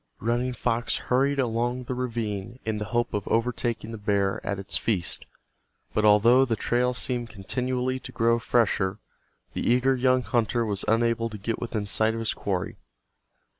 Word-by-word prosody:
Running 120 +3 0
Fox 120 -1 0
hurried 135 +3 +1
along 120 0 0
the 125 - -4
ravine 115 -3 -3
in 110 -1 -1
the 105 - -3
hope 120 +2 -1
of 105 -2 -2
overtaking 115 -1 -1
the 115 - -6
bear 100 -2 0
at 100 - -2
its 95 0 -2
feast, 95 -7 -2 0.7
but 105 - +1
although 110 +5 +6
the 120 -4 0
trail 125 +3 +1
seemed 120 -2 -1
continually 125 +5 -2
to - - -9
grow 115 0 +2
fresher 105 -5 +1 0.6
the - - -3
eager 125 +2 +4
young 130 0 +3
hunter 120 0 +1
was 100 -2 -2
unable 115 0 +2
to 105 - -7
get 110 +3 -3
within 110 -3 -3
sight 110 +2 +1
of - - -3
his 115 - -1
quarry. 95 -3 -3
115 Hz, 170 wpm, -26 LUFS, 105-125 Hz, 0.7 s, although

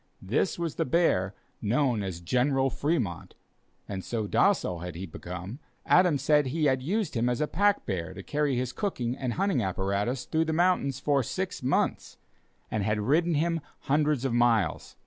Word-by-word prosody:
This 115 - 0
was 170 -2 -2
the - - +2
bear 115 - +1 0.3
known 120 +1 +1
as 95 -4 -5
"General 130 - +1
Fremont," 140 - -2 0.5
and 95 -2 -5
so 115 -3 -2
docile 90 -3 +2
had 90 -1 -6
he 90 +3 -5
become, 90 - -7 0.3
that - - -10
Adams 175 -7 +2
said 150 -2 +4
he 155 +4 0
had 130 -2 +2
used 190 +5 -1
him 120 +1 +1
as 125 - -1
a 150 - +2
pack 200 +6 +1
bear 95 -2 -3
to 95 - -8
carry 145 +1 0
his 125 0 -2
cooking 125 - -2
and 125 -3 -3
hunting 195 -9 +1
apparatus 100 +6 -1
through 160 +1 +1
the 160 - -1
mountains 165 -6 +2
for 140 -1 +2
six 185 - -4
months, 130 +2 0 0.5
and 110 - 0
had 105 +1 0
ridden 160 +10 +2
him 165 +2 0 0.2
hundreds 145 -2 +1
of 130 - 0
miles. 115 - +1
130 Hz, 180 wpm, -28 LUFS, 105-155 Hz, 0.5 s, said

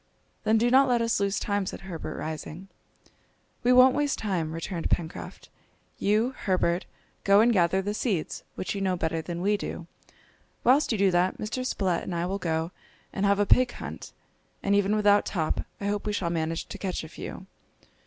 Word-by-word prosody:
"Then 220 +1 +4
do 240 +2 +2
not 270 +1 +6
let 245 -1 +3
us 230 -2 +1
lose 200 0 0
time," 200 -2 -1
said - - -6
Herbert, 165 -5 -6
rising. 160 +4 -6 0.9
"We 245 - +3
won't 255 +1 +7
waste 290 -1 0
time," 180 -7 -2
returned 165 +1 -4
Pencroft. 165 0 -3 0.5
"You, 215 +5 +2
Herbert, 180 -2 0 0.4
go 200 0 +6
and 235 +2 +5
gather 190 0 +2
the 205 +2 -2
seeds, 205 -7 -2
which - - -3
you 200 - -4
know 190 -1 +1
better 165 -1 -1
than 175 +1 -5
we 205 +1 +2
do. 175 - -6 0.8
Whilst 265 +4 +4
you 220 - +1
do 195 -1 +3
that, 180 +1 +2
Mr. 240 +4 -3
Spilett 190 -8 0
and 180 - -5
I 170 0 -1
will 195 +2 -2
go 165 -1 -1 0.4
and 200 +1 +1
have 200 0 +3
a 205 - +2
pig 250 +4 +4
hunt, - - -8 0.5
and 200 - +2
even 200 +1 +3
without 205 -1 +4
Top 160 -5 -2
I 200 - -5
hope 205 +1 -1
we 210 - 0
shall 175 -4 -1
manage 165 -1 -2
to - - -7
catch 185 -4 -3
a - - -7
few!" 185 +3 -8
195 Hz, 195 wpm, -27 LUFS, 170-215 Hz, 0.9 s, won't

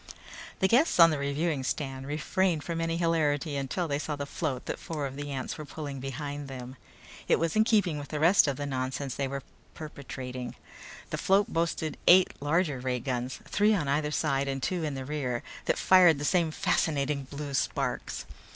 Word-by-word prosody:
The 190 - +5
guests 245 - +3
on 165 -1 +9
the 150 - -1
reviewing 140 +1 -1
stand 135 -1 -3
refrained 155 +2 0
from 165 -1 -3
any 165 0 -1
hilarity 155 -3 +1
until 140 +6 -2
they 145 -1 -1
saw 150 0 -3
the 140 0 -4
float 140 -3 -3
that - - -4
four 155 -3 -4
of 135 -1 -5
the 145 +1 -5
ants 135 +2 -4
were - - -4
pulling 145 -2 -6
behind 140 +2 -5
them. 130 -1 -8 0.5
It - - +4
was 165 -1 -1
in 215 - +5
keeping 200 -9 +2
with 145 - -7
the 150 - -4
rest 170 +2 +6
of 140 -2 -1
the 145 - -3
nonsense 130 0 -3
they 140 - -2
were 135 0 -5 0.3
perpetrating. 130 -4 -7 0.6
The - - -2
float 195 +1 +2
boasted 165 -2 -1
eight 185 +1 +7
larger 150 -1 +1
ray 125 0 -1
guns, 125 0 -3
three 210 +1 +3
on 160 -8 -1
either 150 +2 +1
side 140 -2 0
and 135 -1 -3
two 180 -3 -1
in 150 -3 -2
the 135 -1 -5
rear, 130 -4 -2 0.2
that - - +1
fired 180 -4 +6
the 145 - -3
same 170 0 +2
fascinating 150 -5 0
blue 145 +1 -6
sparks. 135 - -2
145 Hz, 195 wpm, -29 LUFS, 135-165 Hz, 0.6 s, on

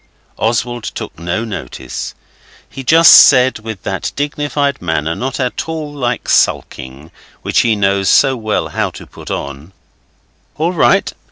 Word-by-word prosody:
Oswald 120 +1 -1
took - - -7
no 90 +7 -3
notice. 110 -4 -7 0.5
He 135 - -9
just 165 +5 +6
said, 130 -3 +7
with 110 -3 -8
that 95 -1 -3
dignified 145 -1 -2
manner, 80 -2 -1
not 130 +8 -4
at 125 +4 -3
all 155 -2 -5
like 125 -4 -3
sulking, 65 +5 -1 0.3
which - - +1
he 115 -2 +2
knows 100 -1 +1
so 135 -2 +4
well 110 -3 -2
how - - -1
to - - -12
put - - -12
on 70 +6 -6 0.8
'All 165 +4 0
right. 170 - +2
120 Hz, 145 wpm, -15 LUFS, 95-140 Hz, 0.8 s, said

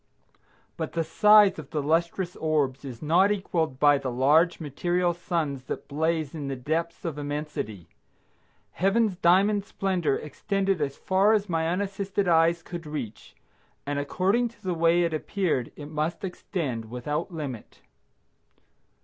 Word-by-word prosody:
But - - -4
the 165 - 0
size 210 0 +5
of 145 - -9
the 155 - -2
lustrous 170 +4 0
orbs 145 -4 0
is 130 -3 -8
not 180 +6 +4
equaled 165 -9 -1
by 145 -1 +5
the 130 - -3
large 150 +8 +3
material 175 +4 0
suns 160 -6 -3
that - - -5
blaze 155 0 -1
in 150 -4 -5
the 135 - -3
depth 160 +8 -3
of 155 -3 -3
immensity. 145 - -5 0.8
Heaven's 195 +2 +1
diamond 195 +3 +3
splendor 185 -7 -1
extended 195 +4 -1
as 140 -1 -2
far 195 +3 +3
as 210 -2 +1
my 165 -2 0
unassisted 195 +2 -1
eyes 170 0 +3
could 175 -3 -7
reach, 135 -8 -7 0.5
and 145 0 -2
according 195 +11 +1
to 225 - -24
the 185 -2 -1
way 170 +1 +3
it 165 -1 0
appeared 155 -5 -1
it 145 0 -9
must 155 +4 -2
extend 155 - -4
without 125 - -4
limit. 140 -9 -7
165 Hz, 145 wpm, -26 LUFS, 145-185 Hz, 0.8 s, size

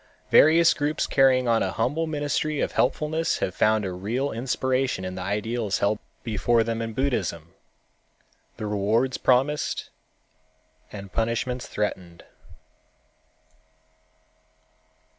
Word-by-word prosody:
Various 165 +2 +6
groups 150 +1 -1
carrying 130 -2 +3
on 115 -1 +3
a 95 - -1
humble 145 +8 -1
ministry 150 0 -1
of - - -1
helpfulness 160 +2 0
have 90 - -2
found 110 +1 +2
a 95 - -3
real 115 +10 -2
inspiration 130 -2 -1
in 95 - -4
the 95 - -6
ideals 105 +2 -2
held 105 +1 0 0.2
before 115 +1 +1
them 115 0 -3
in 115 -1 -4
Buddhism, 95 - -2 1.0
the 110 - -5
rewards 105 +5 0
promised 135 +4 +1 1.0
and 100 -2 -9
punishments 115 +2 -1
threatened. 90 -5 -4
115 Hz, 110 wpm, -25 LUFS, 105-135 Hz, 1.0 s, Various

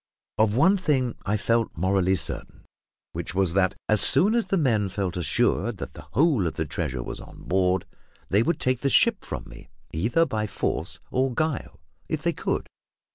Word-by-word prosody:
Of 110 -1 +3
one 170 +10 +5
thing 135 -9 0
I 105 +2 +1
felt 115 -1 0
morally 95 +1 +2
certain, 90 - -5 0.5
which 85 +2 -5
was 95 -3 +1
that, 95 -1 +2
as 110 -2 +5
soon 205 +5 +6
as 235 -1 +2
the 195 - +1
men 110 - +1
felt 95 -2 -3
assured 85 -5 +1
that - - -7
the - - -12
whole 140 - +3
of - - -4
the 80 - -2
treasure 70 -4 -3
was - - -6
on - - -13
board, 90 0 +1 0.4
they 100 +3 +3
would 165 +8 0
take 130 -1 +1
the 140 - 0
ship - - +4
from - - -6
me, - - -14 0.2
either 115 - +2
by 110 -7 -2
force - - -3
or 130 +1 +1
guile, 155 - -2 0.3
if 155 -1 -2
they 170 0 +1
could. - - -2
110 Hz, 185 wpm, -25 LUFS, 95-140 Hz, 0.5 s, soon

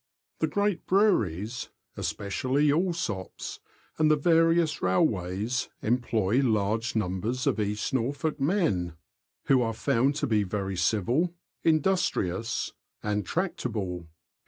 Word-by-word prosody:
The - - +2
great 205 -2 0
breweries 120 - +1 0.3
(especially 130 +9 0
Allsopp's) 160 - -2 0.4
and 155 -1 +4
the 155 - +6
various 165 0 +3
railways 95 +5 0
employ 115 -1 +1
large 110 -1 0
numbers 110 +5 -1
of - - +1
East 105 +3 -1
Norfolk 145 +5 -1
men, 135 - +1 0.5
who 135 -2 +4
are 115 -2 -1
found 130 +6 +2
to 150 - 0
be 110 -5 +2
very 95 0 -2
civil, 120 - +1 0.3
industrious, 145 - +1 0.3
and 105 0 0
tractable. 105 - -2
120 Hz, 110 wpm, -28 LUFS, 100-155 Hz, 0.5 s, the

